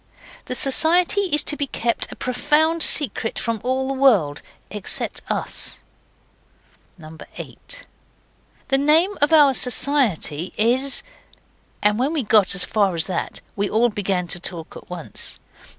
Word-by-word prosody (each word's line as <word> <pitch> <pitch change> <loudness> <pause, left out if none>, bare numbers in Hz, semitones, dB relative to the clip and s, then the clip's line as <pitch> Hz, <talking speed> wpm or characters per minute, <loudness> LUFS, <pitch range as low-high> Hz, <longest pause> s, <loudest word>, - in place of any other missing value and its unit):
The 255 - -2
Society 345 +9 +3
is 295 - +3
to 295 - +1
be 285 -1 -2
kept 235 -2 -2
a - - -8
profound 300 +6 +1
secret 245 -7 +2
from 230 -2 -3
all 260 +1 -1
the 270 - -2
world 215 - +2 0.3
except 205 -1 -3
us. - - -3 1.5
8. - - -10 0.8
The 270 - +4
name 320 +8 +3
of 290 - +3
our 295 -4 +6
Society 240 - +1
is 250 +5 0 0.8
And 210 +2 +2
when 275 +5 0
we 300 -5 -1
got 210 -3 +3
as 185 - -2
far 200 -4 0
as 160 - +3
that 185 -3 -4
we 200 0 -1
all 230 +3 +2
began 195 -4 -2
to 175 - -2
talk 170 -2 -6
at - - -12
once. 180 -3 -7
250 Hz, 140 wpm, -21 LUFS, 200-290 Hz, 1.5 s, our